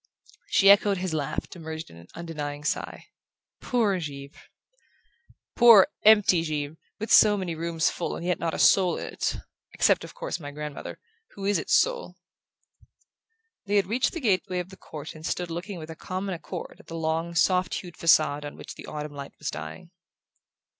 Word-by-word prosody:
She 195 0 +6
echoed 200 0 +4
his 180 -2 -3
laugh 155 -1 -2
to 180 - -11
merge 160 -1 -5
it - - -19
in 85 - -14
an 85 +1 -14
undenying 150 -3 -5
sigh. 150 - -3 0.6
"Poor 215 -7 +1
Givre..." 140 -2 -7 1.2
"Poor 230 -5 +8
empty 210 -5 +6
Givre! 150 -1 -3 0.2
With 220 - -4
so 210 -1 +7
many 185 -3 -3
rooms 165 0 0
full 175 - -4
and 170 - -6
yet 180 0 0
not 165 -1 -2
a - - -4
soul 180 -3 +4
in - - -5
it - - -1 0.4
except - - +3
of - - -10
course - - -4
my 145 -3 -7
grandmother, 150 0 -7 0.4
who 195 - -6
is 205 0 +2
its - - +1
soul!" - - 0 1.5
They 205 - 0
had 200 -2 +4
reached 240 +6 0
the 340 - -4
gateway 190 - 0
of 180 0 -3
the 190 - -12
court 155 -4 -9
and 155 - -12
stood 175 +1 -3
looking 175 +3 -5
with 160 -1 -8
a - - -8
common 190 +3 -4
accord 175 +1 -7
at - - -18
the 165 - -6
long 165 +1 -2
soft 180 0 +2
hued 175 -2 -7
facade 155 -3 +3
on 145 - -8
which - - -9
the - - -11
autumn 150 0 -6
light 140 -1 -8
was 150 - -4
dying. 175 -2 -8
170 Hz, 190 wpm, -26 LUFS, 155-195 Hz, 1.5 s, Poor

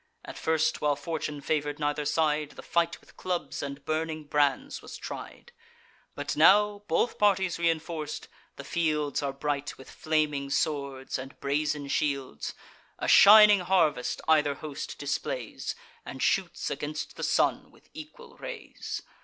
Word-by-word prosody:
At - - -8
first, 160 0 0
while 150 -1 +2
fortune 150 0 -4
favour'd 145 0 -1
neither 145 -1 -1
side, 150 -1 +1
The - - -11
fight 170 0 0
with - - -22
clubs 180 -2 -3
and 140 0 -6
burning 155 0 -2
brands 150 - 0
was - - -9
tried; 475 - -8 0.6
But - - -3
now, 210 +1 +5
both 200 +8 0
parties 190 -3 +3
reinforc'd, 165 -2 -2 0.3
the - - -8
fields 155 -4 0
Are 140 -1 -1
bright 145 +1 -3
with 135 - -13
flaming 150 -3 0
swords 140 -3 -2
and 135 +1 -9
brazen 150 +1 -1
shields. 140 - -2 0.4
A - - -3
shining 210 0 +9
harvest 170 -8 +1
either 150 -3 +4
host 150 -1 -7
displays, 135 -4 -3 0.3
And 135 - -8
shoots 180 -3 0
against 150 +2 -4
the - - -8
sun - - +1
with - - -23
equal 450 +11 -11
rays. 480 -4 -7
155 Hz, 140 wpm, -28 LUFS, 145-170 Hz, 0.6 s, shining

